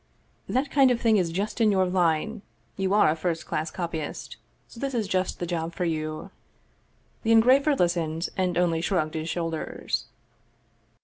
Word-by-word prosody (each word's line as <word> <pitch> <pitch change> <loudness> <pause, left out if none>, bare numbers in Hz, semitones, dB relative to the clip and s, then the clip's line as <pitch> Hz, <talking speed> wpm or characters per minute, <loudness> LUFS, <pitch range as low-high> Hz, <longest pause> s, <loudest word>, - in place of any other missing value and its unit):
That 270 +3 0
kind 275 -2 +5
of 245 -2 +1
thing 225 -2 +3
is 180 -4 +1
just 200 +7 -2
in 215 -2 +5
your 190 -1 +3
line; 180 +4 0 0.3
you 190 -1 -1
are 210 - +5
a - - -1
first 165 0 -2
class 155 +2 -2
copy 170 -1 -4
ist, 150 - -7 0.3
so 230 - -13
this 275 0 -3
is 220 -4 0
just 185 -1 -1
the 175 - -3
job 170 -1 -3
for 180 - -1
you." 155 -2 -3 0.9
The 225 - 0
engraver 260 +6 +5
listened, 170 -4 0
and 180 -2 0
only 170 -2 +2
shrugged 165 -4 0
his 160 0 -3
shoulders. 165 -2 -3
180 Hz, 175 wpm, -26 LUFS, 165-220 Hz, 0.9 s, kind